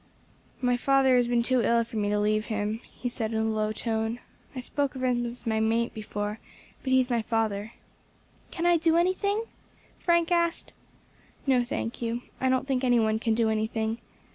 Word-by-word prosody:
"My 245 0 +3
father 270 0 +4
has 245 -1 +3
been 240 -1 +2
too 255 0 +2
ill 235 0 +3
for 230 - -11
me 205 -1 0
to 210 - +1
leave 215 +1 +1
him," 215 0 -2
he 250 - -5
said, 230 -2 -3
in - - 0
a - - +1
low 215 -1 0
tone. 225 +1 -1 0.4
"I - - -3
spoke 280 +2 -2
of 260 - -5
him 245 -1 +1
as 240 +1 -8
my 220 -1 +1
mate 230 +2 +1
before, 210 -1 -4 0.4
but 260 - -3
he 260 - +6
is 255 0 0
my 235 -1 +2
father." 220 -1 -1 0.8
"Can 340 -1 -3
I 345 -1 +5
do 325 0 +3
anything?" 400 +5 +1 0.6
Frank 340 -1 +2
asked. 340 0 +1 0.7
"No, 260 -3 +3
thank 240 -1 -4
you; 235 +1 -2 0.2
I 260 - +2
don't 260 +1 +1
think 265 -2 0
any 245 -2 +4
one 220 -1 +2
can 225 -1 +1
do 230 0 +2
anything. 220 +1 -1
235 Hz, 195 wpm, -27 LUFS, 220-260 Hz, 0.8 s, he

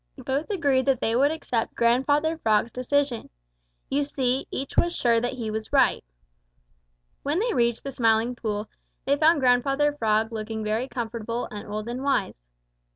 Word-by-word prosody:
Both 280 +7 -1
agreed 280 -9 +1
that 265 -3 +3
they 225 - 0
would 275 +4 +4
accept 255 -7 -2
Grandfather 285 +7 +2
Frog's 220 -1 +2
decision. 255 -1 -1 0.6
You 285 +2 0
see, 265 -2 -1
each 270 - -5
was 345 0 +2
sure 230 -2 +2
that 245 +2 -2
he 230 -4 -4
was 220 0 -5
right. - - +3 1.2
When 290 +3 -1
they 460 +5 0
reached 235 -3 +1
the 275 - -4
Smiling 230 -1 +2
Pool, 215 -2 -3 0.4
they 280 - +3
found 310 0 +4
Grandfather 275 +4 +3
Frog 220 -4 +1
looking 220 0 -4
very 220 +4 -1
comfortable 230 -1 -4
and 205 -1 -7
old 210 +1 -4
and 245 +2 -4
wise. 250 - -1
245 Hz, 160 wpm, -25 LUFS, 225-280 Hz, 1.2 s, would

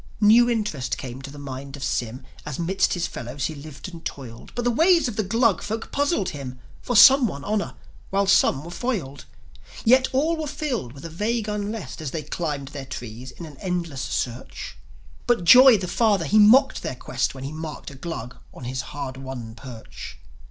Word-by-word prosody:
New 225 +3 +6
interest 210 - -1
came 130 0 -7
to 135 - -8
the 145 - -11
mind 135 0 -7
of 135 - -7
Sym, 120 +2 -2 0.2
As 150 -3 -5
'midst 180 +4 +1
his 175 -1 -1
fellows 130 -1 -5
he 155 - -2
lived 150 +1 -9
and 170 -3 -10
toiled. 120 -4 -8
But 240 - -2
the 245 - +3
ways 330 +6 +4
of 235 - -4
the 215 - +1
Glug 225 +1 +2
folk 220 +2 -5
puzzled 285 - +1
him; 135 -4 -7 0.2
For 245 - -2
some 265 +2 +8
won 140 -7 -6
honour, 210 0 -1 0.3
while 200 +1 +1
some 190 -7 +4
were 170 - -8
foiled; 175 - -3 0.6
Yet 260 +3 +6
all 310 +6 +1
were 310 -1 -3
filled 270 - -3
with 140 +3 -11
a - - -5
vague 215 +5 -1
unrest 210 - -4
As 155 - -3
they 155 +3 -4
climbed 145 -5 -3
their 140 -2 -7
trees 120 +1 -7
in 165 +7 -9
an 150 -3 -12
endless 170 -7 -3
search. 120 0 -4 0.5
But 240 -7 +2
joi, 250 +5 +9
the 185 -2 -4
father, 205 -4 +2
he 215 +9 +4
mocked 250 +7 +6
their 130 - -4
quest, 125 - -2
When 130 - -8
he 135 - -5
marked 155 -2 -7
a - - -11
Glug 130 -5 -6
on - - -12
his 130 +1 -3
hard 135 -2 -6
won 130 -4 -7
perch. 120 -2 -10
165 Hz, 200 wpm, -24 LUFS, 135-225 Hz, 0.6 s, joi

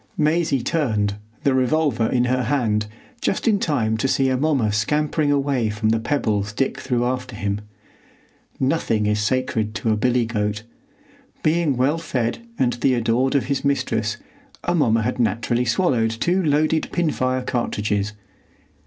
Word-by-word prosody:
Maisie 155 -4 +1
turned, 110 -12 0 0.3
the 140 - +3
revolver 130 -2 +2
in 125 +1 +1
her 125 0 0
hand, 110 -5 0 0.3
just 195 - -1
in 210 -3 +3
time 120 - 0
to 125 - 0
see 135 0 +2
Amomma 130 -4 +1
scampering 150 +7 +1
away 140 -5 +1
from 105 +1 -1
the 115 0 +2
pebbles 105 -5 -1
Dick 135 +5 -1
threw 120 -2 0
after 125 -1 -3
him. 100 0 -2 1.0
Nothing 130 -6 +1
is 105 0 +1
sacred 110 -1 -1
to 115 - 0
a - - +3
billy 125 +2 +1
goat. 105 -2 -2 0.8
Being 155 -4 +2
well 140 +6 +2
fed 125 -8 -2 0.2
and 125 -2 +2
the 125 +2 +1
adored 120 +3 +1
of 135 -5 +2
his 140 0 -1
mistress, 115 -6 0 0.5
Amomma 130 -11 +2
had 110 - -2
naturally 120 +2 +1
swallowed 120 -3 +2
two 170 +12 0
loaded 155 0 +1
pin 170 -3 +1
fire 130 -1 -1
cartridges. 105 -4 -1
125 Hz, 150 wpm, -22 LUFS, 110-145 Hz, 1.0 s, the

